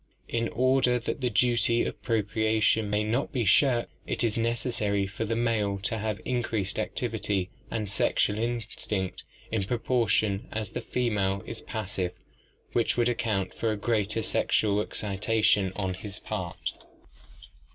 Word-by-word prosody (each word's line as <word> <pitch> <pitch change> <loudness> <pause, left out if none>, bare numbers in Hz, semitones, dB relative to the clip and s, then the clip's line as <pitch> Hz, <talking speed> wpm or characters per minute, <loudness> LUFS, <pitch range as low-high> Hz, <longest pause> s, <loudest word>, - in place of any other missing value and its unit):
In 115 0 0
order 130 0 +3
that 120 +4 -3
the 125 - +2
duty 120 +1 +3
of - - -5
procreation 110 -1 +2
may 105 +1 +1
not 115 +6 0
be 125 -4 0
shirked, 120 +4 +4 0.2
it - - -1
is 115 -2 +1
necessary 115 -3 0
for 100 +3 -4
the 115 +1 -1
male 110 -4 +1
to 115 0 0
have 105 -1 -2
increased 110 -6 -1
activity 105 -5 -1 0.2
and 110 -2 -2
sexual 105 +1 +1
instinct 110 -4 -2 0.3
in 110 -4 0
proportion 110 -3 +1
as 110 -3 -3
the - - -3
female 100 -6 0
is 115 - -6
passive, 95 -5 -3 0.6
which 120 0 +2
would 120 0 +3
account 105 -5 -1
for 115 - -1
the 110 - 0
greater 110 0 0
sexual 105 -1 +2
excitation 105 -1 +1
on 95 -2 -1
his 100 +2 -7
part. - - -4
110 Hz, 140 wpm, -28 LUFS, 100-115 Hz, 0.6 s, shirked